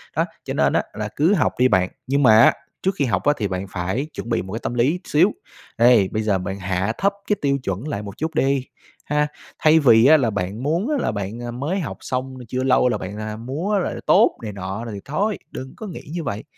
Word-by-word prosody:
Đó, -, -, +2 dB, 0.2 s
cho -, -, -4 dB
nên -, -, +2 dB
á -, -, +2 dB
là 105 Hz, 0 st, -4 dB
cứ 165 Hz, +8 st, +3 dB
học 165 Hz, -, +2 dB
đi 125 Hz, -, +6 dB
bạn, 95 Hz, -5 st, +2 dB, 0.2 s
nhưng 140 Hz, +1 st, +2 dB
mà 110 Hz, -3 st, +7 dB
á, -, -, +7 dB, 0.3 s
trước 190 Hz, 0 st, 0 dB
khi 140 Hz, -, +1 dB
học 115 Hz, -, 0 dB
á 145 Hz, -, +4 dB
thì 105 Hz, -, -1 dB
bạn 95 Hz, +1 st, -3 dB
phải 95 Hz, +10 st, -2 dB
chuẩn 115 Hz, -, -6 dB
bị 115 Hz, -, +1 dB
một 95 Hz, +3 st, -8 dB
cái 115 Hz, -, -3 dB
tâm -, -, -2 dB
lý 130 Hz, +9 st, +1 dB
xíu. 175 Hz, +7 st, +3 dB, 0.5 s
Đây, 115 Hz, -4 st, +5 dB
bây 110 Hz, -, -1 dB
giờ 105 Hz, -3 st, +2 dB
bạn 95 Hz, +1 st, -5 dB
hạ 95 Hz, +3 st, -1 dB
thấp 200 Hz, +1 st, +2 dB, 0.2 s
cái 210 Hz, -, +4 dB
tiêu 140 Hz, -1 st, +2 dB
chuẩn 100 Hz, -, -3 dB
lại 105 Hz, -9 st, -3 dB
một 100 Hz, +3 st, -9 dB
chút 160 Hz, 0 st, -3 dB
đi 135 Hz, -2 st, +1 dB, 0.4 s
ha, 150 Hz, 0 st, +1 dB, 0.3 s
thay 155 Hz, +1 st, +5 dB
vì 115 Hz, -6 st, +6 dB
á 155 Hz, +3 st, +8 dB
là 125 Hz, -5 st, +1 dB
bạn 100 Hz, +3 st, -3 dB
muốn 170 Hz, -, 0 dB
á 300 Hz, -, +1 dB
là -, -, 0 dB
bạn, 100 Hz, +3 st, -5 dB
a, 120 Hz, -, -4 dB
mới 145 Hz, +11 st, -2 dB
học 165 Hz, -, -5 dB
xong 130 Hz, 0 st, -4 dB
chưa 130 Hz, +2 st, -2 dB
lâu 125 Hz, -1 st, +4 dB
là 125 Hz, -, 0 dB
bạn, 100 Hz, +3 st, -7 dB
a, 110 Hz, 0 st, -5 dB
múa 155 Hz, -, -2 dB
là 180 Hz, -, -2 dB
tốt -, -, +4 dB
này 105 Hz, -2 st, -5 dB
nọ 100 Hz, +4 st, -5 dB
rồi 115 Hz, -, -6 dB
thì 100 Hz, -, -6 dB
thôi, 200 Hz, +9 st, -1 dB
đừng 130 Hz, 0 st, -7 dB
có 220 Hz, -, -7 dB
nghĩ 180 Hz, -, -7 dB
như 170 Hz, -1 st, -3 dB
vậy. 105 Hz, -5 st, -4 dB
125 Hz, 255 wpm, -22 LUFS, 105-150 Hz, 0.5 s, á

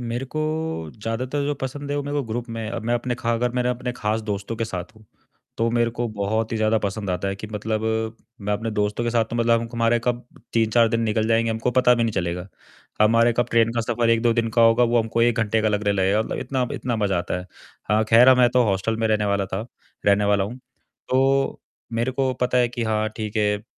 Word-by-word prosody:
मेरे 120 Hz, +2 st, -3 dB
को 155 Hz, -, 0 dB, 0.6 s
ज़्यादातर 125 Hz, +6 st, -3 dB
जो 145 Hz, 0 st, -1 dB
पसंद 140 Hz, +2 st, -5 dB
है 145 Hz, -, -1 dB
वो 145 Hz, -, -1 dB
मेरे 145 Hz, +1 st, -3 dB
को 145 Hz, -, +1 dB
ग्रुप 120 Hz, +2 st, -4 dB
में 110 Hz, -1 st, -4 dB
अब 115 Hz, -, -4 dB
मैं 120 Hz, -, +2 dB
अपने 120 Hz, +1 st, -1 dB
खा 120 Hz, -2 st, -1 dB
अगर 120 Hz, +1 st, 0 dB
मेरा 125 Hz, 0 st, +1 dB
अपने 125 Hz, 0 st, -3 dB
खास 110 Hz, -1 st, -1 dB
दोस्तों 105 Hz, +1 st, -4 dB
के 115 Hz, -, -1 dB
साथ 95 Hz, 0 st, -6 dB
हूँ 110 Hz, -, -18 dB, 0.5 s
तो 115 Hz, -, +2 dB
मेरे 120 Hz, 0 st, +1 dB
को 120 Hz, +1 st, -3 dB
बहुत 110 Hz, +2 st, -2 dB
ही -, -, 0 dB
ज़्यादा 110 Hz, 0 st, +2 dB
पसंद 100 Hz, -1 st, -3 dB
आता 95 Hz, +2 st, -1 dB
है 95 Hz, -, -2 dB
कि 110 Hz, -, -7 dB
मतलब 110 Hz, +1 st, -2 dB, 0.6 s
मैं 105 Hz, +1 st, -2 dB
अपने 110 Hz, +2 st, -2 dB
दोस्तों 105 Hz, +2 st, -1 dB
के 120 Hz, -, 0 dB
साथ 115 Hz, -1 st, +2 dB
तो 120 Hz, -, -3 dB
मतलब 115 Hz, 0 st, +2 dB
हमारे 115 Hz, 0 st, +2 dB
कब 120 Hz, 0 st, -1 dB, 0.3 s
3-4 115 Hz, 0 st, +3 dB
दिन 115 Hz, 0 st, 0 dB
निकल 110 Hz, 0 st, 0 dB
जाएँगे 115 Hz, 0 st, +2 dB
हमको 115 Hz, +2 st, -1 dB
पता 125 Hz, -1 st, +5 dB
भी 120 Hz, -, 0 dB
नहीं 115 Hz, -2 st, 0 dB
चलेगा 90 Hz, -1 st, -2 dB, 0.6 s
हमारे 115 Hz, +2 st, +4 dB
कब 120 Hz, -, +2 dB
ट्रेन 115 Hz, 0 st, +3 dB
का 115 Hz, -, 0 dB
सफर 115 Hz, 0 st, 0 dB
1-2 115 Hz, 0 st, +3 dB
दिन 115 Hz, -1 st, 0 dB
का 115 Hz, -, +7 dB
होगा 115 Hz, +2 st, +5 dB
वो 120 Hz, 0 st, +3 dB
हमको 115 Hz, +1 st, -1 dB
1 120 Hz, -1 st, +3 dB
घंटे 110 Hz, 0 st, +1 dB
का 110 Hz, -, +1 dB
लगने 105 Hz, 0 st, +1 dB
लगेगा 100 Hz, +2 st, +2 dB
मतलब -, -, -4 dB
इतना 130 Hz, -2 st, -1 dB
ब -, -, -7 dB
इतना 120 Hz, -2 st, -2 dB
मज़ा 100 Hz, -4 st, 0 dB
आता 90 Hz, +1 st, -2 dB
है। 90 Hz, -, -9 dB, 0.5 s
हाँ, 110 Hz, +1 st, +3 dB
खैर 115 Hz, +3 st, +6 dB
अब 130 Hz, -1 st, +7 dB
मैं 125 Hz, -1 st, +5 dB
तो 125 Hz, -1 st, +5 dB
हॉस्टल 100 Hz, +2 st, 0 dB
में 115 Hz, -, +1 dB
रहने 105 Hz, -1 st, +1 dB
वाला 100 Hz, -1 st, 0 dB
था 95 Hz, +5 st, -4 dB, 0.4 s
रहने 100 Hz, 0 st, +4 dB
वाला 100 Hz, -1 st, +2 dB
हूँ, 110 Hz, +6 st, -6 dB, 0.5 s
तो 135 Hz, +1 st, +2 dB, 0.3 s
मेरे 120 Hz, +3 st, 0 dB
को 130 Hz, 0 st, 0 dB
पता 125 Hz, 0 st, +2 dB
है 125 Hz, -1 st, +4 dB
कि 120 Hz, -1 st, -4 dB
हाँ, 110 Hz, -1 st, 0 dB
ठीक 110 Hz, -1 st, -5 dB
है, 105 Hz, 0 st, +1 dB
115 Hz, 245 wpm, -23 LUFS, 105-120 Hz, 0.6 s, का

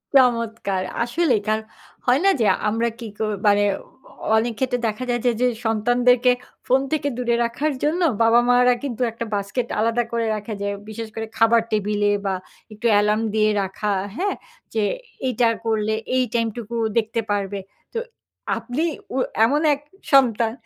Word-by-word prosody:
চমৎকার! 230 Hz, -7 st, +2 dB, 0.2 s
আসলেই 245 Hz, -3 st, +1 dB
কার 215 Hz, 0 st, +2 dB, 0.5 s
হয় 250 Hz, +1 st, +4 dB
না -, -, +7 dB
যে 220 Hz, -, +3 dB, 0.2 s
আমরা 230 Hz, +2 st, 0 dB
কি 230 Hz, -, -6 dB
কো 220 Hz, -, -1 dB, 0.2 s
মানে 205 Hz, 0 st, +5 dB, 0.2 s
অ -, -, -16 dB, 0.5 s
অনেক 230 Hz, +1 st, 0 dB
ক্ষেত্রে 255 Hz, -1 st, 0 dB
দেখা 215 Hz, +3 st, -3 dB
যায় 240 Hz, -1 st, 0 dB
যে, 245 Hz, -, +5 dB
যে 250 Hz, -, +4 dB, 0.2 s
সন্তানদেরকে 245 Hz, +3 st, +3 dB, 0.4 s
ফোন 260 Hz, +2 st, +4 dB
থেকে 295 Hz, -2 st, 0 dB
দূরে 240 Hz, -1 st, +1 dB
রাখার 280 Hz, +6 st, -1 dB
জন্য 315 Hz, +5 st, +1 dB, 0.2 s
বাবা-মারা 245 Hz, +2 st, +5 dB
কিন্তু 255 Hz, -4 st, -4 dB
একটা 230 Hz, +1 st, -5 dB
বাস্কেট 200 Hz, +5 st, -2 dB
আলাদা 230 Hz, +2 st, +2 dB
করে 230 Hz, -1 st, 0 dB
রাখা 210 Hz, +1 st, -5 dB
যে। 200 Hz, -, -1 dB, 0.2 s
বিশেষ 225 Hz, +1 st, -5 dB
করে 225 Hz, -, -3 dB
খাবার 230 Hz, 0 st, +5 dB
টেবিল 210 Hz, -1 st, 0 dB, 0.2 s
বা 195 Hz, -, +1 dB, 0.4 s
একটু 215 Hz, +3 st, -10 dB
এলার্ম 210 Hz, +1 st, +2 dB
দিয়ে 215 Hz, 0 st, +3 dB
রাখা। 195 Hz, +2 st, -2 dB, 0.2 s
হ্যাঁ? 395 Hz, +6 st, -1 dB, 0.4 s
যে 220 Hz, -1 st, +1 dB, 0.4 s
এইটা 245 Hz, -1 st, +2 dB, 0.2 s
করলে 220 Hz, -1 st, +1 dB, 0.2 s
এই 255 Hz, -, +3 dB
টাইম 230 Hz, -1 st, +2 dB
টুকু 235 Hz, -1 st, -6 dB, 0.2 s
দেখতে 225 Hz, 0 st, +1 dB
পারবে। 200 Hz, -1 st, -1 dB, 0.3 s
তো 465 Hz, -, -1 dB, 0.6 s
আপনি 245 Hz, +7 st, -3 dB, 0.3 s
ও -, -, 0 dB, 0.3 s
এমন 290 Hz, +5 st, +2 dB
এক 285 Hz, -, -3 dB, 0.3 s
সন্তান 235 Hz, -4 st, +4 dB
230 Hz, 160 wpm, -22 LUFS, 215-250 Hz, 0.6 s, না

